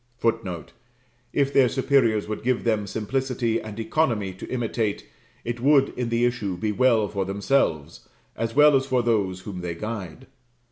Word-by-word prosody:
[Footnote: 95 -8 -2 0.6
If 140 +1 +1
their 130 -3 +5
superiors 125 -6 +2
would 110 0 -4
give 125 0 0
them 110 -3 0
simplicity 120 +2 -1
and 110 0 -8
economy 110 -5 0
to 95 - -10
imitate, 115 -4 -2 0.4
it 120 0 -3
would, 135 +1 +4
in 125 -2 -4
the 115 +1 +2
issue, 110 -7 -2
be 105 +4 -1
well 115 -1 +3
for 100 -1 -2
themselves, 95 - -1 0.3
as 115 +1 -3
well 150 0 +7
as 135 0 +1
for 125 -2 +1
those 100 -6 0
whom 90 -2 -7
they 85 -1 -4
guide. 105 +2 -6
115 Hz, 160 wpm, -24 LUFS, 100-130 Hz, 0.6 s, well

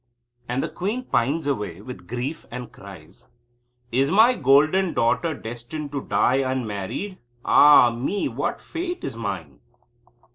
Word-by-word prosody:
And 125 +2 -1
the - - -1
queen 210 +8 -3
pines 145 - 0
away 105 - -2
with 110 -4 -10
grief 125 +7 -5
and 125 0 -7
cries: 95 -6 -13 0.6
"Is 135 +4 +2
my 220 +8 +6
golden 155 - +3
daughter 155 +7 +1
destined 120 +6 -7
to 140 -1 -3
die 130 - +2
unmarried? 130 - -3 0.3
Ah 145 -5 +7
me! 135 - -2
What - - -3
a - - -20
fate 355 +1 -5
is 130 - -4
mine." 95 - -5
135 Hz, 140 wpm, -23 LUFS, 115-165 Hz, 0.6 s, Ah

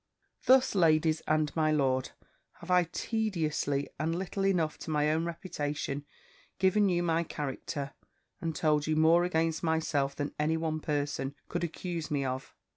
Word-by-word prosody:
"Thus, 260 +1 +6
ladies 160 -3 +3
and, 155 -1 +1
my 155 -1 +2
lord 130 -4 +1 0.4
have 170 - -8
I 180 -1 +5
tediously, 160 -8 -1
and 165 +3 0
little 195 +1 -1
enough 165 -5 +1
to - - -7
my 150 -1 +2
own 160 +2 0
reputation, 145 -4 -4 0.5
given 195 +2 +3
you 175 -1 +1
my 165 -1 +2
character, 145 -2 -4 0.5
and 165 -2 -2
told 150 -1 +2
you 155 - +1
more 160 +2 +5
against 165 -2 0
myself 160 -4 0
than 145 -1 -3
any 155 +2 +2
one 160 -1 -1
person 145 -2 -2
could 175 0 -2
accuse 170 -1 -4
me 140 -3 0
of. 130 +1 -4
160 Hz, 155 wpm, -30 LUFS, 150-170 Hz, 0.5 s, Thus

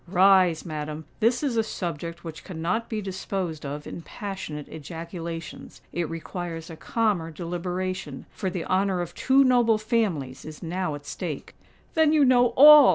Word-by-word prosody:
"Rise, 185 -2 +5
madam: 155 -1 -5
this 235 +5 +2
is 260 -5 0
a 225 - +4
subject 170 -4 -5
which 160 -2 -8
cannot 180 +6 -2
be 215 -2 -2
disposed 185 -5 -3
of 145 +1 -5
in - - -7
passionate 165 -6 -6
ejaculations;—it 165 +1 -6
requires 165 0 -5
a - - -7
calmer 205 -3 0
deliberation—for 180 0 -4
the 180 -2 -4
honour 190 -1 +1
of 175 - -5
two 270 +1 +4
noble 240 -4 +4
families 195 - -1
is 155 -1 -9
now 175 -2 -2
at 145 0 -10
stake!" - - -5 0.4
"Then 315 -1 +4
you 300 -3 +5
know 245 -1 +6
all!" 295 0 +10
180 Hz, 150 wpm, -26 LUFS, 160-215 Hz, 0.4 s, all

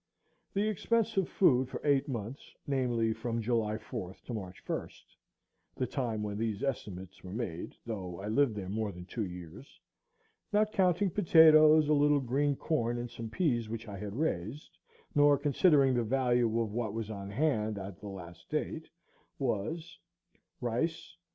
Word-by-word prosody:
The 205 +2 +2
expense 225 +1 +1
of 195 -3 +1
food 130 -8 +3
for - - -5
eight 140 -2 +3
months, 120 -1 -6
namely, 120 -5 +1
from 115 +1 -3
July 110 -2 0
4th 95 -3 -7
to 125 - -6
March 95 -4 -7
1st, - - -5 0.7
the 130 - -1
time 115 -4 -2
when 105 0 -3
these 110 -3 -2
estimates 95 -9 -4
were 90 - -8
made, 95 -8 -4
though 95 -6 -5
I 100 - -5
lived 120 +1 +2
there 100 -3 -5
more 105 +1 -2
than 90 -1 -10
two 110 +3 -3
years,—not 210 - -5
counting 185 0 +2
potatoes, 155 -4 +7
a 150 - +4
little 145 0 +4
green 140 +3 +1
corn, 120 -6 -1
and 120 0 -5
some 115 -1 -6
peas, 120 -7 0
which 115 0 -5
I 100 -2 -7
had 105 0 -5
raised, 130 - -3 0.4
nor 145 -1 +5
considering 140 -1 +4
the 120 - +2
value 125 0 +2
of 115 -3 -1
what 110 -2 -2
was 110 -1 -3
on 100 -2 -6
hand 110 -3 0
at 95 -2 -7
the 105 - -8
last 90 -3 -10
date, 155 +1 -3 0.5
was 145 +7 -3 0.6
Rice 125 +8 -2
120 Hz, 160 wpm, -31 LUFS, 105-150 Hz, 0.7 s, potatoes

